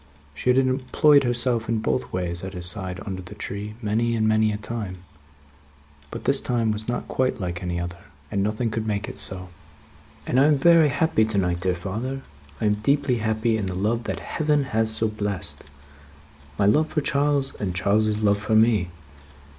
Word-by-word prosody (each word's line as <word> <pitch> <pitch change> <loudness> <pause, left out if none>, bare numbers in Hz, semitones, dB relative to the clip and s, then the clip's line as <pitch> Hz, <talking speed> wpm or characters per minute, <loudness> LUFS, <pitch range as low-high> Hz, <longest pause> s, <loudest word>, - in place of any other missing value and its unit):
She 75 - -2
had 125 - +4
employed 135 +2 +4
herself 120 -2 0
in 115 - +1
both 65 -10 -1
ways, 90 -1 -3
at 95 0 -6
his 90 -1 -2
side 90 0 -2
under 95 -2 -5
the 95 +3 -11
tree, 105 +1 -6
many 115 +3 +1
and 110 -1 +1
many 110 0 +3
a 105 - -3
time; 105 -4 -6 1.1
but, - - -7
this 135 0 +2
time 115 -3 0
was 105 +1 -4
not 120 - -3
quite 130 -1 0
like 90 -2 -4
any 90 -1 -2
other, 85 0 -5 0.3
and 100 -2 0
nothing 110 +3 -1
could 110 0 -3
make 105 0 -2
it - - -6
so. 90 -1 -4 0.8
"And 125 - +1
I 135 - +6
am 150 -1 +4
very 165 +1 +5
happy 140 -4 +2
to 110 -2 -1
night, 90 -2 +1
dear 90 +1 0
father. 115 +10 -4 0.4
I - - -1
am 105 0 +2
deeply 140 +1 +2
happy 110 +1 0
in 100 -3 -2
the 90 - -3
love 110 +5 -1
that - - -3
Heaven 150 -2 0
has 110 0 +2
so 110 0 +3
blessed 105 -4 -1 0.9
my 100 - +2
love 150 +10 +4
for 155 - -1
Charles, 140 -1 +1
and 90 -3 -3
Charles's 105 +3 +1
love 100 -1 +3
for 110 +1 0
me. 110 -5 +3
110 Hz, 195 wpm, -24 LUFS, 95-125 Hz, 1.1 s, I